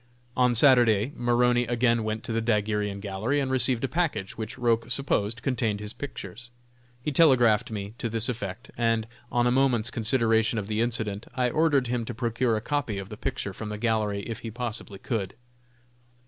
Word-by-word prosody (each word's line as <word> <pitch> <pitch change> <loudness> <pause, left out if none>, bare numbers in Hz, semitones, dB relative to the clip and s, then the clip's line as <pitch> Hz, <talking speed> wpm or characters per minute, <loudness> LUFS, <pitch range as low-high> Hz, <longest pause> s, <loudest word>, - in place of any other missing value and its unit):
On 125 -1 +3
Saturday 120 -1 +5
Maroney 120 0 +2
again 120 -1 +2
went 110 +1 -3
to 115 - -4
the 115 - 0
daguerrean 105 -2 0
gallery 105 +8 -1
and 135 -2 -1
received 125 -1 +3
a - - +2
package, 160 - -2
which 110 +3 -6
Roch 115 -2 +1
supposed 120 -3 -1
contained 115 -6 0
his 105 0 -6
pictures. 120 -3 -8 0.5
He 150 - -1
telegraphed 125 -7 +4
me 105 -2 -5
to 115 - -2
this 115 0 -1
effect, 115 +1 -5
and, 115 -2 +1 0.3
on 120 0 +2
a 120 - +3
moment's 125 -3 +2
consideration 115 -1 +2
of 105 - -2
the 105 +2 -1
incident, 110 -3 -1
I 125 -2 +1
ordered 150 -3 +2
him 120 -1 -1
to - - -6
procure 115 0 0
a - - -3
copy 130 -5 -2
of 100 0 -6
the 105 - -7
picture 120 -4 -4
from 105 +2 -6
the 105 - -4
gallery 105 -3 0
if 115 +2 -6
he 115 - -6
possibly 115 -3 -5
could. 100 -2 -3
115 Hz, 185 wpm, -26 LUFS, 105-125 Hz, 0.5 s, Saturday